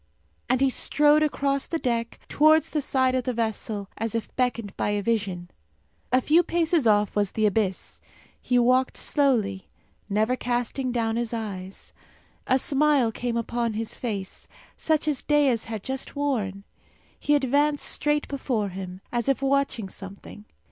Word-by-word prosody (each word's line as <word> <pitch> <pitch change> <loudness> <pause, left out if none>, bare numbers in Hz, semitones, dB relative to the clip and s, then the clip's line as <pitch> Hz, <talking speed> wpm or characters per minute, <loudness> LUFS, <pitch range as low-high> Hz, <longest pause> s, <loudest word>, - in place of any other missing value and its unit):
And 255 +1 +2
he 270 -1 +4
strode 300 +3 +4
across 280 -2 0
the 330 - -1
deck, 235 -5 -2
towards 310 +1 +4
the 300 - 0
side 260 -1 +1
of 255 -1 -1
the 255 - -1
vessel, 220 -3 -2
as 225 0 -2
if 230 - -4
beckoned 235 -5 -1
by - - -1
a 205 -1 -1
vision. 195 -6 -2 0.6
A 255 +1 +4
few 315 +6 +4
paces 335 -5 +1
off 210 -1 +3
was 205 -2 0
the 220 - +1
abyss. 200 -3 -1 0.4
He 250 - +1
walked 255 +2 +3
slowly, 220 -10 0 0.4
never 215 +5 +1
casting 245 +1 -2
down 230 -2 0
his 235 0 -2
eyes. 195 -4 -7 0.5
A 260 - +4
smile 280 -4 +2
came 235 +1 -3
upon 235 0 -1
his 220 +1 -3
face, 200 -6 -5 0.3
such 310 -1 0
as 290 -4 0
Dea's 285 -6 +2
had 220 -3 -6
just 265 +2 -4
worn. 220 -9 -2 0.6
He 295 - +2
advanced 290 +2 +2
straight 295 0 0
before 250 -7 -2
him, 185 0 -7
as 240 +1 -1
if 275 0 +1
watching 275 -6 +1
something. 195 +2 -10
240 Hz, 155 wpm, -25 LUFS, 215-275 Hz, 0.6 s, he